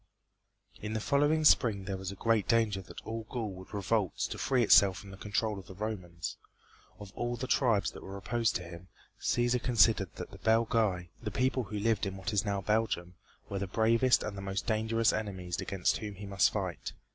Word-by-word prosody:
In 105 +1 -4
the 110 - -1
following 145 +6 +2
spring 105 -9 +4
there 95 0 -3
was 95 0 -5
great 110 +1 +1
danger 110 -4 +2
that 95 - -11
all 110 -1 -5
Gaul 115 -5 -3
would 95 0 -11
revolt 100 -1 0
to - - -5
free 130 -3 +2
itself 100 -3 +6
from 100 0 -10
the - - -9
control 105 +1 -2
of 95 - -13
the 95 - -10
Romans. 90 -5 -5 0.6
Of 100 -2 -10
all 120 0 -2
the 125 +2 -4
tribes 115 -7 +2
that - - -11
were 95 +1 -7
opposed 115 +3 0
to 90 - -2
him, 85 +1 -10 0.3
Cæsar 120 0 +1
considered 110 -6 +3
that - - -7
the - - -12
Belgæ, 110 -6 +2
the 110 - -3
people 130 +3 0
who 105 0 -5
lived 110 -1 +1
in 95 0 -5
what 95 +3 -4
is 100 -1 +2
now 100 -2 -1
Belgium, 105 -4 0 0.3
were 100 - -3
the 100 - -3
bravest 115 +5 +3
and 105 - -4
the 100 - -6
most 95 0 -3
dangerous 110 0 +2
enemies 95 -5 -3
against 95 -3 0
whom 105 -2 -6
he 100 +2 -8
must 100 -2 +3
fight. - - -4
105 Hz, 205 wpm, -31 LUFS, 95-115 Hz, 0.6 s, itself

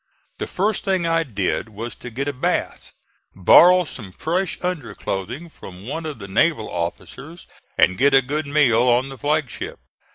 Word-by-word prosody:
The - - -3
first 205 +2 -1
thing 190 -3 0
I 165 0 +2
did 110 - -2
was 110 +1 -7
to 125 - -8
get 135 +5 -4
a 145 - -1
bath, 125 - -2 0.4
borrow 180 - +7
some 110 -10 -9
fresh 175 - -2
underclothing 120 - -4
from 95 - -12
one 160 +6 -4
of 150 -4 -6
the 100 -3 -9
naval 115 +4 +1
officers 135 - -6 0.3
and 95 - +3
get 140 +1 +5
a 135 - +5
good 145 +3 -3
meal 140 -6 +3
on 125 +3 +2
the 135 - -9
flag 150 0 +1
ship. - - -7
135 Hz, 170 wpm, -21 LUFS, 110-165 Hz, 0.4 s, borrow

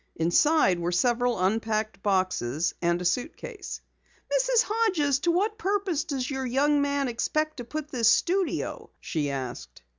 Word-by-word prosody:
Inside 180 - +3
were 170 +1 -1
several 240 +5 +1
unpacked 215 +2 -1
boxes 185 - 0
and 170 0 +1
a 180 - -5
suitcase. 305 - -3 0.5
"Mrs. - - +3
Hodges, 370 - +1
to 340 +4 +1
what 420 +6 0
purpose 390 -6 0
does 265 -3 -3
your 265 -1 -3
young 285 +4 +2
man 280 -1 0
expect 305 +6 -1
to 245 - -5
put 305 +4 -5
this 235 -4 +2
studio?" 360 +10 0
she 150 -4 -2
asked. 125 - -6
255 Hz, 145 wpm, -27 LUFS, -, 0.5 s, Inside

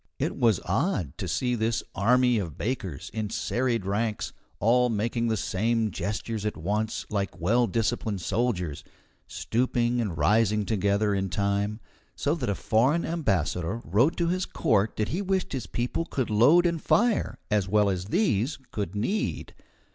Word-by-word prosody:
It - - -1
was 115 -7 +3
odd 95 - 0
to - - -3
see 125 -1 0
this 115 -1 0
army 125 +3 +3
of 85 -7 -5
bakers 100 - -4
in 110 -2 -2
serried 120 -2 -1
ranks, 105 +2 -1 0.3
all 125 +3 +3
making 115 +2 -1
the 110 -1 +1
same 110 +4 0
gestures 105 +1 -3
at 105 - -2
once, 105 +2 -2
like 100 -2 -2
well 115 +8 +2
disciplined 110 -3 -1
soldiers, 90 - -1 0.4
stooping 120 0 0
and 95 -7 -3
rising 105 +5 +3
together 100 0 +1
in 95 -1 -1
time, 100 +2 -1 0.3
so 145 - 0
that 140 -10 -2
a 100 - 0
foreign 130 - +2
ambassador 95 - -1
wrote 115 - +2
to 170 - +1
his 185 +2 0
court 105 0 +1
that 110 - -1
he 180 - -1
wished 190 -3 -1
his 130 -4 -4
people 125 +7 -2
could 130 -8 -2
load 140 +12 +5
and 170 -2 0
fire 235 0 +2
as 105 -3 +2
well 105 +1 +3
as 95 -2 -1
these 130 - +1
could 100 -2 -4
knead. 155 - -2
110 Hz, 160 wpm, -27 LUFS, 100-125 Hz, 0.4 s, load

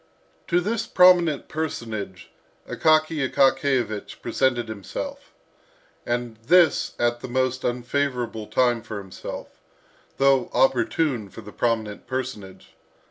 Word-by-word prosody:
To 175 - +3
this 210 +5 -2
prominent 175 -5 +4
personage 110 - -5 0.4
Akaky 155 -3 +2
Akakiyevich 135 -6 +1
presented 120 -3 0
himself, 105 -4 -7 0.8
and 120 -2 -2
this 165 +8 +3
at 120 0 +1
the - - -7
most 130 +1 -1
unfavourable 120 -3 -2
time 120 -2 +2
for 110 -1 -7
himself, 95 -2 -8 0.7
though 135 -2 +3
opportune 125 -2 +1
for 115 - -11
the 105 -1 -11
prominent 110 -3 -2
personage. 120 -7 -6
125 Hz, 105 wpm, -24 LUFS, 115-140 Hz, 0.8 s, prominent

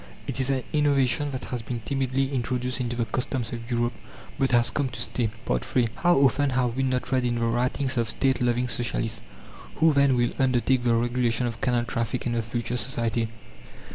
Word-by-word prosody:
It - - -3
is 130 0 +1
an 130 -2 0
innovation 145 -1 +2
that 130 -2 -5
has 125 -2 -4
been 115 +1 -5
timidly 135 +2 -1
introduced 125 0 -1
into 120 -1 -2
the 120 -1 0
customs 125 0 -2
of 115 0 -7
Europe, 120 0 0 0.5
but 135 -1 +2
has 120 -1 +3
come 140 -3 0
to 120 - -7
stay. 120 -1 -1 0.2
III 125 -2 +1
How 175 0 +4
often 140 +1 +3
have 125 -2 0
we 135 - 0
not 130 -1 -1
read 130 -1 +2
in 120 -1 0
the 120 - -2
writings 125 +3 0
of 115 -2 +1
State 130 +3 +1
loving 125 0 +1
Socialists: 115 -1 -2 0.5
"Who, 160 -1 +4
then, 140 -2 +4
will 120 -1 +2
undertake 130 -1 +2
the 120 -1 +3
regulation 120 0 +1
of 115 -2 -4
canal 120 -2 +1
traffic 115 0 -2
in 120 - 0
the 115 - +1
future 120 +2 -3
society? 115 -3 -1
125 Hz, 200 wpm, -26 LUFS, 120-130 Hz, 0.5 s, How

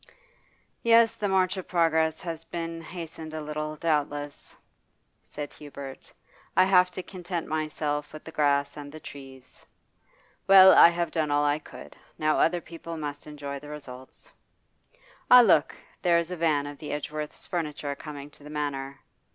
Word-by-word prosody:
'Yes, 230 -1 +5
the 205 - -2
march 190 0 +2
of 185 - -6
progress 160 -2 +2
has 165 -2 -5
been 165 -1 -5
hastened 165 -2 -8
a - - -3
little, 155 0 -4
doubtless,' 145 -2 -2 0.7
said 145 -1 -8
Hubert. 140 -2 -10 0.5
'I 185 - +7
have 180 -1 +5
to 185 - -7
content 175 -3 -5
myself 155 -1 -2
with 155 - -10
the 160 - -10
grass 145 -1 +1
and 145 -1 -8
the 155 - -10
trees. 135 -3 -12 0.8
Well, 190 -1 +9
I - - +9
have 170 0 -2
done 155 -3 0
all 145 0 +2
I 145 +1 +2
could, - - -12 0.2
now 155 0 +1
other 175 +1 +2
people 165 0 -8
must 145 -1 -6
enjoy 145 -2 -6
the 145 +1 -12
results. 135 - -11 1.0
Ah, 250 0 +10
look! 235 - +4 0.3
there 175 -2 +4
is 170 +1 -1
a - - -2
van 155 -4 +1
of 145 0 -8
the 150 - -6
Edgeworths' 150 +1 -5
furniture 150 -4 -3
coming 145 0 -9
to 145 - -18
the 150 - -10
Manor. 140 -2 -4
155 Hz, 160 wpm, -27 LUFS, 145-170 Hz, 1.0 s, Ah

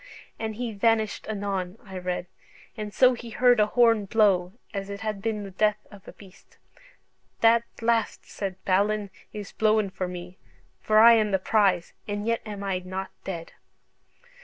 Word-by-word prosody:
"And 220 -1 -3
he 235 0 -4
vanished 220 +1 +1
anon," 200 -2 -3
I 190 -2 -10
read: 180 0 -3 0.5
"and 210 -2 -5
so 255 +4 +5
he 235 -1 -8
heard 245 +1 +4
an 210 - +4
horne 230 -2 +3
blow, 195 -4 +2 0.2
as 195 -1 -4
it 200 +1 -6
had 215 -2 -3
been 215 -1 -2
the 195 - -8
death 210 +2 +2
of 200 -2 -15
a - - -8
beast. 195 -2 -18 0.8
'That 230 0 +5 0.2
blast,' 230 -1 0
said 195 -2 -5
Balin, 200 +1 +1 0.2
'is 205 -2 -7
blowen 215 -2 +2
for 185 -1 -3
me, 180 0 -8 0.4
for 215 - +2
I 230 +2 +9
am 215 -2 +3
the 195 - +2
prize, 190 -3 +1
and 205 0 -3
yet 230 0 0
am 205 -1 -6
I 195 -2 -1
not 185 +1 -6
dead.'" 170 -3 -6
205 Hz, 170 wpm, -26 LUFS, 190-220 Hz, 0.8 s, I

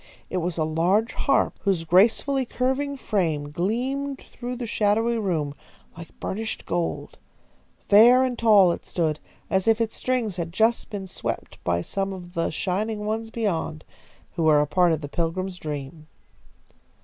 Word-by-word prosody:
It 185 - -1
was 175 -1 -2
a 160 - +1
large 175 +8 +1
harp, 275 - +1
whose 190 -5 +1
gracefully 225 - +3
curving 265 +3 -1
frame 160 - -1
gleamed 260 - -2
through 250 -1 -7
the 245 -1 -5
shadowy 225 +2 +1
room 160 -8 -1 0.4
like 165 -1 -12
burnished 220 +3 -4
gold. 175 -1 -3 0.7
Fair 240 +5 +7
and 255 -1 -1
tall 210 -6 +5
it - - -5
stood, 155 -3 -1 0.3
as 190 +1 0
if 225 0 +4
its 225 -1 -1
strings 240 -7 -1
had 170 -1 -3
just 225 +6 +2
been 200 -2 -5
swept 185 - -5
by 85 0 0
some 195 0 -2
of 175 -2 -10
the 165 -1 0
Shining 210 +6 -2
Ones 225 +1 -2
beyond, 170 -9 -2 0.5
who - - -4
were 155 -2 +6
a 150 - +3
part 175 +4 +3
of 160 -1 0
the 145 - -5
Pilgrim's 180 +4 -2
dream. 150 0 -6
195 Hz, 160 wpm, -24 LUFS, 165-225 Hz, 0.7 s, Fair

